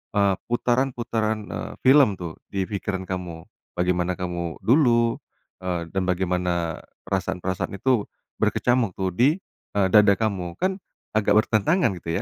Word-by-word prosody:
eee, 100 Hz, -1 st, +3 dB
putaran-putaran, 120 Hz, -3 st, 0 dB
eee, -, -, -5 dB
film 135 Hz, -1 st, +7 dB
tuh 85 Hz, -3 st, -6 dB, 0.2 s
di 95 Hz, -1 st, 0 dB
pikiran 95 Hz, -2 st, -3 dB
kamu, 90 Hz, -3 st, -5 dB, 0.3 s
bagaimana 90 Hz, 0 st, +1 dB
kamu 85 Hz, -2 st, -4 dB
dulu, 120 Hz, -3 st, +4 dB, 0.5 s
eee, 90 Hz, -2 st, -1 dB
dan 95 Hz, -1 st, 0 dB
bagaimana 90 Hz, -2 st, -1 dB, 0.2 s
perasaan-perasaan 95 Hz, -1 st, -2 dB
itu, 120 Hz, 0 st, +1 dB, 0.4 s
berkecamuk 120 Hz, -4 st, +2 dB
tuh 95 Hz, -1 st, 0 dB
di, 135 Hz, -, +3 dB, 0.4 s
eee, 100 Hz, -2 st, +3 dB
dada 105 Hz, -1 st, +7 dB
kamu 95 Hz, -6 st, -2 dB
kan 190 Hz, +1 st, +1 dB, 0.4 s
agak 105 Hz, -2 st, +3 dB
bertentangan 115 Hz, -, +2 dB
gitu 85 Hz, -, -8 dB
100 Hz, 130 wpm, -24 LUFS, 90-120 Hz, 0.5 s, film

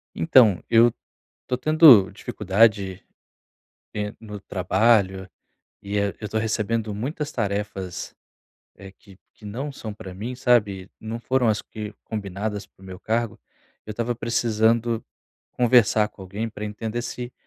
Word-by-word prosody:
Então, 100 Hz, +2 st, +5 dB
eu 115 Hz, +1 st, +5 dB, 0.6 s
tô 125 Hz, -, -1 dB
tendo 150 Hz, -, +7 dB
dificuldade 100 Hz, -1 st, +1 dB, 0.9 s
en 105 Hz, 0 st, -4 dB
no 105 Hz, -2 st, -8 dB
trabalho, 95 Hz, 0 st, +1 dB, 0.5 s
e, 100 Hz, +1 st, -3 dB
eh 100 Hz, -1 st, 0 dB
eu 105 Hz, -, -6 dB
tô 110 Hz, -, -2 dB
recebendo 110 Hz, 0 st, -1 dB
muitas 145 Hz, -, -4 dB
tarefas, 100 Hz, -5 st, -4 dB, 0.6 s
eh, 95 Hz, -1 st, -12 dB
que 95 Hz, 0 st, -19 dB, 0.2 s
que 105 Hz, -, -16 dB
não 130 Hz, +8 st, -5 dB
são 110 Hz, -6 st, -7 dB
pra 95 Hz, -3 st, -10 dB
mim, 115 Hz, +7 st, -6 dB
sabe, 105 Hz, -7 st, +1 dB
não 110 Hz, +1 st, -5 dB
foram 130 Hz, 0 st, +1 dB
as 105 Hz, -1 st, +1 dB
que 105 Hz, -1 st, -8 dB
combinadas 105 Hz, 0 st, -4 dB
para -, -, -28 dB
o -, -, -13 dB
meu 95 Hz, -1 st, -9 dB
cargo, 115 Hz, +1 st, -2 dB, 0.5 s
eu 110 Hz, -, -6 dB
estava 115 Hz, +3 st, -2 dB
precisando 115 Hz, 0 st, +1 dB, 0.5 s
conversar 115 Hz, -3 st, +4 dB
com 105 Hz, -, -15 dB
alguém 100 Hz, +5 st, -4 dB
pra 105 Hz, -1 st, -7 dB
entender 110 Hz, +3 st, -4 dB
se 120 Hz, +1 st, -6 dB
110 Hz, 140 wpm, -24 LUFS, 100-115 Hz, 0.9 s, tendo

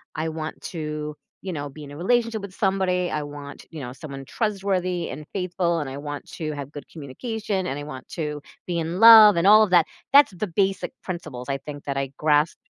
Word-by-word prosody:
I 160 Hz, +1 st, -2 dB
want 155 Hz, 0 st, -5 dB
to, 150 Hz, -2 st, -5 dB, 0.3 s
you 185 Hz, -2 st, -4 dB
know, 145 Hz, -1 st, -4 dB
be 150 Hz, +2 st, -11 dB
in 145 Hz, -, -10 dB
a 145 Hz, -, -9 dB
relationship 230 Hz, +4 st, +1 dB
with 200 Hz, -2 st, -8 dB
somebody. 190 Hz, -3 st, 0 dB
I 150 Hz, -, -1 dB
want, 145 Hz, -1 st, -9 dB
you 160 Hz, -, -8 dB
know, 125 Hz, -3 st, -6 dB
someone 135 Hz, -1 st, -8 dB
trustworthy 190 Hz, -, -1 dB
and 150 Hz, +2 st, -8 dB
faithful, 180 Hz, -2 st, 0 dB
and 145 Hz, -3 st, -3 dB
I 135 Hz, -, -6 dB
want 145 Hz, 0 st, -6 dB
to 155 Hz, -2 st, -4 dB
have 140 Hz, 0 st, -7 dB
good 145 Hz, -, -10 dB
communication, 190 Hz, -, -4 dB
and 135 Hz, -, -3 dB
I -, -, -6 dB
want 130 Hz, -3 st, -9 dB
to 150 Hz, -3 st, -4 dB, 0.2 s
be 175 Hz, -2 st, -2 dB
in 165 Hz, +3 st, -3 dB
love, 220 Hz, -3 st, +10 dB
and 170 Hz, -, +2 dB
all 215 Hz, +1 st, +9 dB
of 210 Hz, -, 0 dB
that. 175 Hz, -3 st, +5 dB, 0.3 s
That's 280 Hz, -4 st, +7 dB
the 185 Hz, +4 st, -3 dB
basic 195 Hz, +5 st, 0 dB
principles 155 Hz, -8 st, -6 dB
I 135 Hz, -, 0 dB
think 145 Hz, +1 st, -9 dB
that 140 Hz, -1 st, -2 dB
I 135 Hz, 0 st, 0 dB
grasp 150 Hz, +1 st, +2 dB
165 Hz, 215 wpm, -24 LUFS, 145-190 Hz, 0.3 s, love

